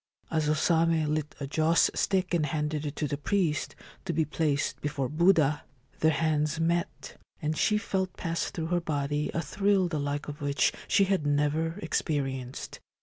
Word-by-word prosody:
As 155 -2 +1
O 155 - +3
Same 160 -1 +2
lit 155 -1 -3
a 140 - -3
joss 160 +4 +3
stick 185 -2 0
and 155 -3 +2
handed 150 0 -2
it 145 - -5
to 150 - -1
the 145 0 -3
priest, 165 -2 0 0.3
to 175 - -1
be 160 0 +1
placed 150 -1 -1
before 145 -3 -2
Buddha, 155 -1 +3 0.4
their 160 - +4
hands 155 0 +1
met, 170 +1 -1 0.2
and 155 0 -1
she 210 +6 +2
felt 190 -3 -2
pass 165 -1 -2
through 160 - -4
her 175 - +2
body 145 -2 -1
a 170 - 0
thrill 200 -2 +2
the 160 -3 -2
like 145 0 -2
of 145 0 -7
which 140 0 +2
she 200 - +4
had 190 -6 +1
never 150 +4 +1
experienced. 135 -4 -2
155 Hz, 175 wpm, -28 LUFS, 145-170 Hz, 0.4 s, their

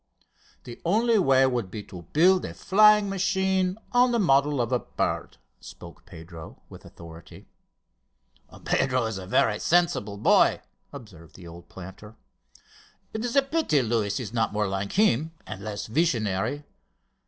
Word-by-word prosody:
"The 120 -1 -11
only 220 +5 +2
way 135 -6 +4
would 120 -7 -2
be 105 +2 -7
to 85 -4 -12
build 180 +4 +4
a - - -7
flying 210 +1 +4
machine 190 -1 0
on 245 0 +3
the 235 - +1
model 145 - +2
of 120 0 -1
the 125 - +1
bird," - - -4 0.2
spoke - - -13
up - - -32
Pedro 80 0 -12
with - - -14
authority. 85 -1 -14 1.2
"Pedro 130 -2 0
is 110 -3 -4
a 95 - -9
very 105 +2 +1
sensible 155 - 0
boy," 100 - +3 0.3
observed 95 - -13
the 90 - -13
old 85 +1 -13
planter. 95 +4 -12 1.0
"It 220 +1 -4
is 245 +1 -3
a 275 - +5
pity 275 - 0
Luis 110 -1 -1
is 115 -3 -7
not 115 -2 0
more 105 -1 -1
like 95 +1 -4
him 160 - +1
and 95 - -9
less 105 -1 -5
visionary. 115 - -1
125 Hz, 155 wpm, -25 LUFS, -, 1.2 s, a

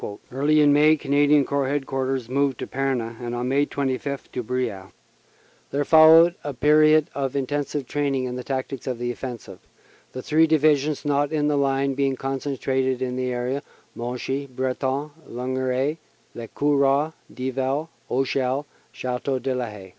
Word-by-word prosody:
Early 145 +4 +3
in 145 -1 +5
May 150 +2 +5
Canadian 145 0 +3
Corps 140 0 0
Headquarters 135 -2 -2
moved 135 0 0
to - - -4
Pernes 125 -4 -2
and 120 0 -4
on 120 +1 -2
May 140 +2 +2
25 140 0 -3
to 125 - -3
Bryas. 115 -6 -3 0.8
There 145 +1 -1
followed 160 +2 +7
a 145 -2 -5
period 155 +2 +5
of 135 -1 -3
intensive 140 +1 -2
training 140 -3 -1
in 125 -1 -3
the 125 - -5
tactics 135 0 -4
of 125 -2 -2
the 120 +1 -2
offensive, 120 -7 -8 0.5
the 130 - -7
three 160 +1 +3
divi 155 -1 +5
sions 145 +2 -3
not 145 0 +1
in 150 -1 +1
the 150 - +1
line 135 -1 +1
being 135 0 0
concentrated 130 -1 -2
in 125 -1 -3
the 130 0 -2
area 125 +3 -2 0.3
Monchy 125 +3 -4
Breton 130 +3 -2 0.2
Lignereuil 130 +4 -1 0.4
Le 115 -1 -7
Cauroy 145 +2 +2 0.2
Dieval 130 +4 -2 0.2
Auchel 135 +1 0 0.3
Chateau 130 +1 -2
de 130 +1 -2
la 125 -1 -2
Haie. 100 -3 -11
135 Hz, 155 wpm, -24 LUFS, 125-145 Hz, 0.8 s, followed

